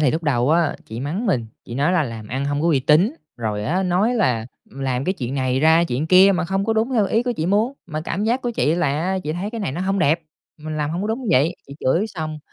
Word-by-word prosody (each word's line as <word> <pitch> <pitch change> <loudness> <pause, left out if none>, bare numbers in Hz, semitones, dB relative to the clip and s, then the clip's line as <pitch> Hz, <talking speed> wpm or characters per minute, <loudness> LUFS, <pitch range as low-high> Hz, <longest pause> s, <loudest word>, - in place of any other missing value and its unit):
thì 145 -4 +3
lúc 160 +4 -2
đầu 135 -3 +1
á 165 -1 +2
chị 110 +2 -7
mắng 170 - -3
mình, 125 - 0 0.2
chị 120 - -8
nói 145 +7 +1
là 180 -4 +3
"Làm 115 -4 -7
ăn 130 +2 -2
hông 145 +1 -1
có 170 - +2
uy 140 -5 +3
tín", 165 - +3 0.2
rồi 105 -3 -3
á, 180 - 0
nói 190 +6 +1
là, 125 - +1 0.2
ừm, 135 - -10
làm 130 -1 -1
cái 185 - +1
chuyện 130 -6 -5
này 130 -1 0
ra 160 +2 +5
chuyện 140 +1 -2
kia 185 +3 +7
mà 180 - 0
không 195 +3 -1
có 225 - +1
đúng 225 +4 0
theo 215 -5 +3
ý 225 +4 +1
của 245 0 -1
chị 160 - -1
muốn, 210 +7 +2
mà 155 -2 -4
cảm 185 +6 -3
giác 240 +3 0
của 245 - -1
chị 160 -8 +1
là 175 - +1 0.2
á, 190 +1 0
chị 155 - -2
thấy 185 +5 -4
cái 230 -1 -5
này 195 - -2
nó 170 - -4
hông 195 +1 0
đẹp, 165 -1 +2 0.4
mình 155 0 -5
làm 150 0 -1
hông 175 +4 -3
có 210 - -2
đúng 235 +3 -3
vậy. 160 +3 +3
Chị 140 - -10
chửi 170 +11 +1
xong 155 -6 -5
165 Hz, 285 wpm, -21 LUFS, 140-195 Hz, 0.4 s, kia